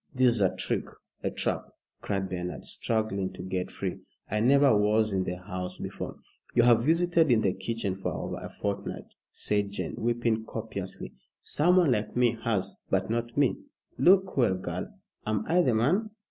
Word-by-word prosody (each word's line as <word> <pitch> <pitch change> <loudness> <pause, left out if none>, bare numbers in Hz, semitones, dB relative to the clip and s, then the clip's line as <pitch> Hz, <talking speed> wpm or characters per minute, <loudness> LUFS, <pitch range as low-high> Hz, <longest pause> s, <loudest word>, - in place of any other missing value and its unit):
"This 125 -1 +5
is 115 - -1
a 95 - +3
trick - - -2 0.4
a - - 0
trap!" - - -1 0.4
cried 95 -1 -1
Bernard, 90 -1 -5
struggling 110 -4 -1
to 90 - -8
get 95 -1 -2
free. - - -4 0.3
"I 105 - +1
never 135 +2 +5
was 105 +1 +3
in 95 -1 +1
the 90 - -2
house 90 0 -5
before - - -5 0.2
" - - -31
"You 120 - +6
have 115 -1 +5
visited 165 +1 +3
in 115 -3 +4
the 95 -3 +2
kitchen 115 -5 -3
for 95 - -3
over - - -4
a - - -7
fortnight," 100 -1 -4 0.2
said 105 -1 -1
Jane, 100 - -4
weeping 115 -1 +1
copiously. 110 -4 -5 0.3
"Someone 175 -1 +3
like 105 -3 -1
me 120 -1 +3
has, 105 -5 -1
but 95 +2 +1
not 120 +1 -2
me. 140 -3 +3 0.4
Look 190 +6 +5
well, 120 -8 +3
girl. 95 - -5 0.4
Am 110 -1 0
I 175 +2 +4
the 125 -9 +2
man?" 180 - +2
110 Hz, 175 wpm, -28 LUFS, 100-125 Hz, 0.4 s, You